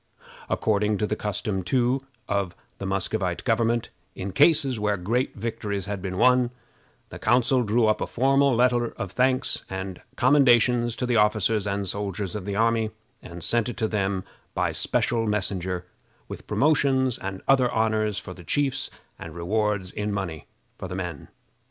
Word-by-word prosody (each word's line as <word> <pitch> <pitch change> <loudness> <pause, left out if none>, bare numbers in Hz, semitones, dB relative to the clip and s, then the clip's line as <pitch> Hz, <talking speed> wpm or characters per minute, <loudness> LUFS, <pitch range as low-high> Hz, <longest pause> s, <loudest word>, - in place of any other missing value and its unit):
According 105 -1 +1
to 105 - 0
the - - -1
custom, 105 -1 -2
too, 125 +7 +1 0.2
of 100 -3 -1 0.2
the 95 - -4
Muscovite 95 -2 -1
government, 115 -1 +1 0.2
in 95 +1 -4
cases 140 - +3
where 105 -1 +1
great 115 +9 -1
victories 105 -2 -3
had 100 -2 -4
been 95 -1 -4
won, 125 +1 +4 0.6
the - - -9
council 125 +1 +3
drew 115 +1 +2
up 110 0 +2
a - - -1
formal 135 +1 +3
letter 120 -1 +2
of 100 -5 -5
thanks 130 +2 +1
and 95 -1 -5
commendations 120 -3 +4
to 125 - -2
the 120 -2 +2
officers 105 0 +2
and 100 0 -2
soldiers 100 -1 -3
of 105 -3 -5
the 100 -1 -3
army, 115 0 +2 0.3
and 85 -1 -9
sent 120 0 +1
it 120 - -6
to 110 -2 0
them 100 -3 -1 0.3
by - - +1
a - - -5
special 115 -2 +1
messenger, 95 -3 -2 0.4
with - - -9
promotions 135 -4 +2
and 95 0 -6
other 130 -2 +4
honors 110 -2 +1
for 95 - -6
the 90 - -13
chiefs, 135 - 0 0.3
and 80 -1 -8
rewards 100 +1 -1
in 105 0 -3
money 90 -7 -4 0.3
for 95 - -5
the 90 - -6
men. 90 -6 -5
105 Hz, 165 wpm, -25 LUFS, 95-120 Hz, 0.6 s, won